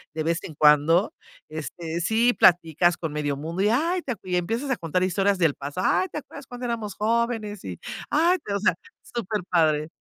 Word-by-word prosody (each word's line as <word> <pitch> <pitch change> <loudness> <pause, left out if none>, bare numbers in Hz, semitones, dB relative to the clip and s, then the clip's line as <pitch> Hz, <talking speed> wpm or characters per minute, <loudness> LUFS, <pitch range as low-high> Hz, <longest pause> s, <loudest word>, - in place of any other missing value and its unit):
de 155 - -1
vez 165 +1 0
en 155 - -8
cuando, 150 +6 +4 0.4
este, 160 +2 -5
sí 230 +6 +3
platicas 175 -1 +4
con 160 -3 -4
medio 145 -2 -2
mundo, 165 +5 -4
y: 205 - +3
"Ay, 335 +10 +1
te 260 - -3
acue", 185 -4 -11
y - - +2
empiezas 230 +10 -2
a - - +2
contar 175 +2 -1
historias 195 +1 +1
del 165 -5 +2
pasado, 145 +6 -4
"Ay 375 - +2
te - - -5
acuerdas - - -12
cuando 245 0 -7
éramos 225 -4 -3
jóvenes", 220 -2 -1
y, 90 -3 -7 0.3
"ay" 340 +5 +3 0.2
o 200 - 0
sea, 200 - +3 0.3
superpadre. 175 -9 0
185 Hz, 190 wpm, -25 LUFS, 160-230 Hz, 0.4 s, cuando